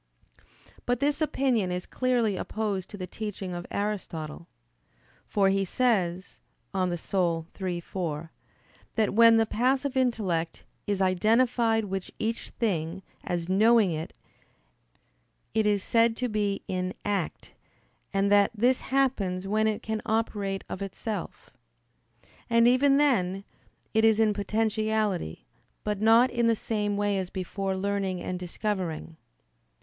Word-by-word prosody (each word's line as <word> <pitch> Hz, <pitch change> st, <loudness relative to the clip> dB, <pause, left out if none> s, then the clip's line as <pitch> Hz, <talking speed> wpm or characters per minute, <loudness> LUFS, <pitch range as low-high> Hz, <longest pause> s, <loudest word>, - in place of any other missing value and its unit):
But 245 Hz, -1 st, +1 dB
this 290 Hz, +3 st, 0 dB
opinion 260 Hz, -10 st, +1 dB
is 180 Hz, 0 st, -3 dB
clearly 245 Hz, -5 st, +1 dB
opposed 200 Hz, -2 st, -3 dB
to 205 Hz, -, -8 dB
the 185 Hz, -, -4 dB
teaching 195 Hz, -1 st, -5 dB
of 175 Hz, 0 st, -6 dB
Aristotle. 175 Hz, -6 st, -4 dB, 0.8 s
For 195 Hz, -2 st, +3 dB
he 195 Hz, 0 st, +2 dB
says 190 Hz, -5 st, 0 dB, 0.3 s
(De 195 Hz, -, -1 dB
Anima 175 Hz, -1 st, 0 dB, 0.2 s
iii, 180 Hz, -2 st, -1 dB
4) 165 Hz, -3 st, -4 dB, 0.6 s
that, 220 Hz, -3 st, +1 dB
when 230 Hz, +1 st, +7 dB
the 225 Hz, -, +4 dB
passive 260 Hz, +5 st, 0 dB
intellect 205 Hz, -10 st, 0 dB, 0.2 s
"is 200 Hz, -2 st, +1 dB
identified 225 Hz, +4 st, +2 dB
with 190 Hz, -1 st, -4 dB
each 225 Hz, +1 st, -3 dB
thing 185 Hz, -4 st, -2 dB, 0.2 s
as 170 Hz, -1 st, -2 dB
knowing 215 Hz, +1 st, +4 dB
it, 160 Hz, 0 st, -4 dB, 1.4 s
it 220 Hz, -1 st, +2 dB
is 205 Hz, -2 st, +2 dB
said 230 Hz, 0 st, +3 dB
to 250 Hz, -, -1 dB
be 205 Hz, -3 st, -1 dB
in 185 Hz, 0 st, -2 dB
act," 200 Hz, -5 st, -2 dB, 0.6 s
and 195 Hz, 0 st, +1 dB
that 205 Hz, -1 st, +5 dB
"this 245 Hz, +4 st, +2 dB
happens 220 Hz, -9 st, 0 dB
when 215 Hz, +2 st, +1 dB
it 215 Hz, -1 st, -2 dB
can 220 Hz, 0 st, -2 dB
operate 205 Hz, -3 st, -1 dB
of 190 Hz, -, -6 dB
itself. 205 Hz, +2 st, -5 dB, 1.0 s
And, 230 Hz, 0 st, +5 dB
even 275 Hz, +3 st, +4 dB
then, 195 Hz, -10 st, +2 dB, 0.5 s
it 220 Hz, 0 st, +3 dB
is 220 Hz, -1 st, +5 dB
in 220 Hz, -1 st, +4 dB
potentiality, 215 Hz, -, -1 dB, 0.4 s
but 210 Hz, -1 st, -2 dB
not 230 Hz, +3 st, +5 dB
in 235 Hz, -1 st, +1 dB
the 230 Hz, -, +4 dB
same 210 Hz, -2 st, -2 dB
way 205 Hz, -1 st, +1 dB
as 185 Hz, -1 st, -4 dB
before 190 Hz, +1 st, -3 dB
learning 195 Hz, -1 st, -1 dB
and 180 Hz, 0 st, -4 dB
discovering." 180 Hz, -3 st, -3 dB
205 Hz, 135 wpm, -27 LUFS, 185-225 Hz, 1.4 s, when